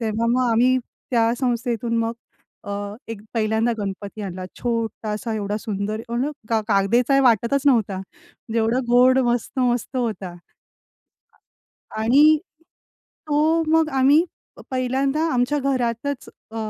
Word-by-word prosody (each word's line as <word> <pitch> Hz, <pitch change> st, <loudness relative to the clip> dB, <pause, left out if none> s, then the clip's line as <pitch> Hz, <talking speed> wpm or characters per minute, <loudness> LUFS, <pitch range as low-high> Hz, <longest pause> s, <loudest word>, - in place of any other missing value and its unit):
तेव्हा 225 Hz, 0 st, -1 dB
मग 250 Hz, 0 st, +2 dB
आम्ही 245 Hz, +3 st, +4 dB, 0.3 s
त्या 230 Hz, -2 st, +3 dB
संस्थेतून 235 Hz, -2 st, -1 dB
मग 230 Hz, 0 st, 0 dB, 0.5 s
अ, -, -, -7 dB, 0.4 s
एक 225 Hz, -3 st, -6 dB
पहिल्यांदा 220 Hz, +1 st, +1 dB
गणपती 200 Hz, +1 st, -5 dB
आणला 185 Hz, -2 st, -5 dB, 0.2 s
छोटासा, 225 Hz, -1 st, -2 dB
एवढा 205 Hz, -1 st, -2 dB
सुंदर, 210 Hz, 0 st, -3 dB
एवना 245 Hz, +5 st, -1 dB, 0.2 s
का 225 Hz, -1 st, +2 dB
कागदाचा 225 Hz, +6 st, +2 dB
आहे 275 Hz, -, +5 dB
वाटतच 240 Hz, +2 st, +3 dB
नव्हता 225 Hz, -8 st, +3 dB
म्हणजे 235 Hz, -, -8 dB
एवढा 225 Hz, +3 st, +1 dB
गोड 250 Hz, +2 st, +5 dB
मस्त-मस्त 245 Hz, +1 st, -1 dB
होता. 220 Hz, -7 st, -2 dB, 1.6 s
आ 220 Hz, -, -4 dB
आणि 290 Hz, +7 st, +6 dB, 0.9 s
तो 310 Hz, +2 st, +2 dB
मग 320 Hz, 0 st, +3 dB
आम्ही 280 Hz, +5 st, +5 dB, 0.5 s
पहिल्यांदा 265 Hz, +3 st, 0 dB
आमच्या 250 Hz, +4 st, +1 dB
घरातच 260 Hz, 0 st, -2 dB, 0.2 s
अ, -, -, -10 dB
235 Hz, 120 wpm, -22 LUFS, 220-260 Hz, 1.6 s, आणि